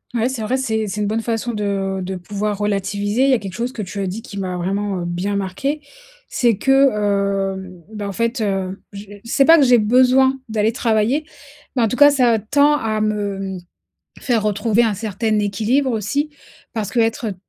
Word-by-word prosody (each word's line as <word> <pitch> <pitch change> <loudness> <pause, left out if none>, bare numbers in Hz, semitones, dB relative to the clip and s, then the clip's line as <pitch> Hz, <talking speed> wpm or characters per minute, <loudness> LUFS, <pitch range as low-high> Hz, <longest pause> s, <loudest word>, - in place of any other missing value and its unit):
Ouais, 235 0 +1
c'est 260 -3 -4
vrai 245 +5 0
c'est 220 -4 -1
c'est 210 +2 -3
une 205 - 0
bonne 220 +2 -1
façon 230 +1 -2
de 195 -2 -2
de 185 +1 -4
pouvoir 205 +3 -3
relativiser. 205 +3 0
Il - - +3
y 265 - +5
a - - +2
quelque 195 -3 -7
chose 240 +5 -3
que 215 - -5
tu 200 +2 -6
as 195 - -1
dit 215 +5 -5
qui 200 - -8
m'a 185 -2 -3
vraiment, 195 +1 -2
heu, 175 - -4
bien 180 +4 -2
marquée, 200 +11 -2 0.5
c'est 235 -5 +1
que, 270 +3 +4 0.6
hem, 185 -2 -10
ben, 205 -1 -5
en - - -3
fait, 230 +4 -1
heu, 195 -2 -2
je 200 0 -8
heu, 205 - -11
c'est 265 +4 +2
pas 330 0 +7
que - - +5
j'ai 245 -1 +6
besoin 255 +4 +4
d'aller 215 0 +1
travailler 230 +6 +1 0.5
mais 245 - +2
en - - +3
tout 250 - -2
cas, 290 +1 +7
ça 245 -5 +3
tend 285 +7 +3
à 220 -6 -1
me, 205 -2 -1
mmh, 190 -1 -5 0.6
faire 235 -4 +1
retrouver 215 +2 +1
un 220 -2 +2
certain 215 +1 -1
équilibre 220 +7 +1
aussi, 235 +7 -1 0.5
parce 210 -3 -3
que 235 - -2
être, 225 +1 0
heu, 200 - -4
215 Hz, 215 wpm, -19 LUFS, 200-245 Hz, 0.6 s, pas